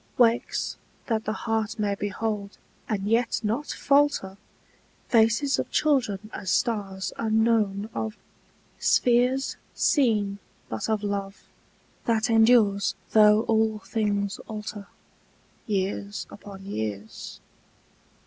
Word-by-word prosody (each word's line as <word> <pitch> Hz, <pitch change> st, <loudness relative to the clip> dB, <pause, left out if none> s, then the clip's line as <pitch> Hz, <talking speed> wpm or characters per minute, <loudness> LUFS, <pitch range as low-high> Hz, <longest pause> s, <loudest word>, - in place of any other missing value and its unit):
Wakes, 235 Hz, -1 st, +2 dB, 0.3 s
that 220 Hz, -2 st, -1 dB
the 215 Hz, -, -1 dB
heart 220 Hz, -1 st, -1 dB
may 205 Hz, -2 st, 0 dB
behold, 205 Hz, 0 st, -3 dB, 0.3 s
and 200 Hz, -3 st, -1 dB
yet 230 Hz, +2 st, +2 dB
not 230 Hz, +8 st, -1 dB
falter, 280 Hz, -9 st, +2 dB, 0.7 s
Faces 230 Hz, +4 st, +3 dB
of -, -, -2 dB
children 220 Hz, -9 st, +1 dB
as 190 Hz, -2 st, -5 dB
stars 195 Hz, -2 st, -1 dB
unknown 220 Hz, -2 st, +2 dB
of, 220 Hz, 0 st, -3 dB, 0.6 s
spheres 250 Hz, +2 st, +2 dB, 0.2 s
Seen 210 Hz, -8 st, +2 dB, 0.3 s
but 110 Hz, -, -3 dB
of 215 Hz, -1 st, 0 dB
love, 200 Hz, -1 st, -3 dB, 0.6 s
that 225 Hz, 0 st, +1 dB
endures 220 Hz, -3 st, +4 dB, 0.2 s
though 210 Hz, 0 st, +6 dB
all 220 Hz, -1 st, +2 dB
things 205 Hz, -1 st, -1 dB
alter, 210 Hz, -2 st, -6 dB, 0.8 s
Years 200 Hz, 0 st, -2 dB
upon 200 Hz, -2 st, -11 dB
years. 110 Hz, -, -5 dB
215 Hz, 100 wpm, -26 LUFS, 200-230 Hz, 0.8 s, though